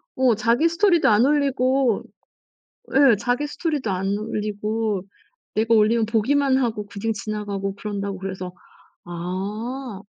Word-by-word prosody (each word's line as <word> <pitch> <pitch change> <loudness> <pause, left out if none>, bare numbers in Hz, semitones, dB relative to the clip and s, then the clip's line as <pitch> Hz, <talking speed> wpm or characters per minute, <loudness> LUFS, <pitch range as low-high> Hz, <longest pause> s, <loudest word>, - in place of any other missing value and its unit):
어 255 -4 +3
자기 240 +9 +2
스토리도 345 - +3
안 215 +3 +5
올리고 270 -4 +2 0.9
예 270 -5 +6
자기 245 +7 -1
스토리도 295 - -2
안 195 +2 -1
올리고 215 -1 -2 0.5
"내가 225 +1 +2
올리면 220 +1 +4
보기만 260 +5 +2
하고 225 -5 -1
그냥 205 +2 -3
지나가고 200 -1 -4
그런다."고 200 -1 -4
그래서 190 -2 -5 0.5
아 200 +7 -5
220 Hz, 270 characters per minute, -23 LUFS, 200-260 Hz, 0.9 s, 예